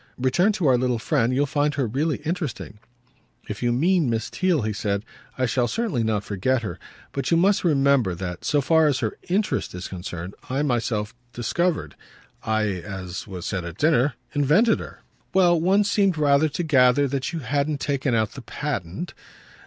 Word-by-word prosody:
"Return 130 +11 +2
to 195 -5 -2
our 130 -3 +4
little 125 -1 +1
friend. 120 0 +1
You'll 135 +3 +2
find 145 +2 0
her 135 - 0
really 140 +7 -1
interesting." 155 - -4 0.7
"If 105 - -6
you 120 -1 +2
mean 165 +3 +2
Miss 115 -1 -2
Theale," 180 -8 +1
he 110 0 -1
said, 100 0 -2 0.3
"I 130 - +1
shall 125 0 +1
certainly 215 - -1
not 110 -2 0
forget 115 +6 0
her. 90 -6 -5 0.3
But 135 -2 -2
you 165 - +4
must 195 +4 +3
remember 140 - +3
that, 90 -1 -6
so 145 -2 +2
far 160 +3 +4
as 140 -3 +2
her 110 -3 -3
'interest' 195 - 0
is 90 - -5
concerned, 90 0 -6 0.2
I 135 +3 0
myself 115 -6 -1 0.2
discovered, 170 +8 -1 0.5
I 110 0 0 0.2
as 95 +1 -6
was 90 -3 -7
said 95 -4 -2
at 85 +1 -7
dinner 145 -3 +3 0.2
invented 150 - +3
her." - - -10 0.3
"Well, 175 -3 +4
one 195 +4 +4
seemed 200 -3 +2
rather 145 +1 +3
to 150 +4 -3
gather 140 -2 +4
that 135 +1 -2
you 170 - -4
hadn't 145 +2 -1
taken 140 -4 0
out 110 -2 +1
the 135 - -9
patent. 120 - -4
135 Hz, 180 wpm, -24 LUFS, 110-155 Hz, 0.7 s, our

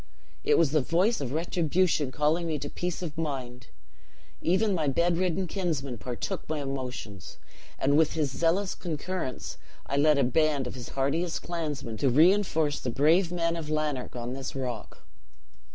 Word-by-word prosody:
It - - +4
was 160 -5 +4
the 155 -1 +3
voice 180 - +2
of 130 -3 -3
retribution, 165 -2 +1
calling 155 +5 +1
me 155 -2 -1
to 145 0 -5
peace 180 0 -3
of 155 -4 -5
mind! 125 -5 -4 0.7
Even 195 +5 +2
my 160 -5 0
bedridden 175 +5 +1
kinsman 155 - -2
partook 125 +5 -4
my 155 -1 -1
emotions; 130 -8 -5 0.4
and 140 +2 +2
with 160 0 +4
his 150 -4 0
zealous 180 +4 +1
concurrence, 170 -4 -4 0.3
I 140 - -2
led 150 +1 +5
a 140 - +4
band 145 +2 +2
of 125 - -5
his 125 -2 -8
hardiest 160 +6 -1
clansmen, 145 -9 -4
to 135 - +2
reinforce 160 0 +4
the 125 - -3
brave 165 +8 +3
men 170 -1 0
of 160 -3 -5
Lanark 150 -5 -1
on 120 0 -4
this 135 0 -5
rock. 125 -5 -5
155 Hz, 160 wpm, -28 LUFS, 135-170 Hz, 0.7 s, led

